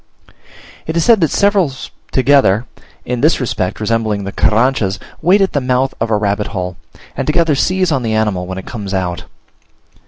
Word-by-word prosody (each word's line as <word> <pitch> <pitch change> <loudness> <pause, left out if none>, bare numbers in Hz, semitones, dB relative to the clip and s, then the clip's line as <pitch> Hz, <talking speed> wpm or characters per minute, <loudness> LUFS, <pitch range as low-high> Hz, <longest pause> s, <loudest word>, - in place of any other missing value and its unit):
It 160 +1 -2
is 165 - +2
said 230 -5 +5
that 160 - +3
several 200 -5 +2 0.4
together 130 -5 +3 0.4
(in 125 -1 -2
this 155 +4 +3
respect 105 -8 -2
resembling 110 -2 -1
the 100 - -5
Carranchas) 110 -3 +1 0.2
wait 185 +5 +4
at 195 - +1
the 145 - +1
mouth 130 +1 0
of 115 - 0
a 110 - +2
rabbit 105 0 -1
hole, 90 -4 -4 0.4
and - - -3
together 160 0 +2
seize 185 +5 +1
on 135 -3 +1
the 110 -2 -1
animal 105 -5 0
when 95 0 -5
it 95 - -7
comes 100 -5 -5
out. 90 -2 -3
120 Hz, 180 wpm, -16 LUFS, 100-150 Hz, 0.4 s, said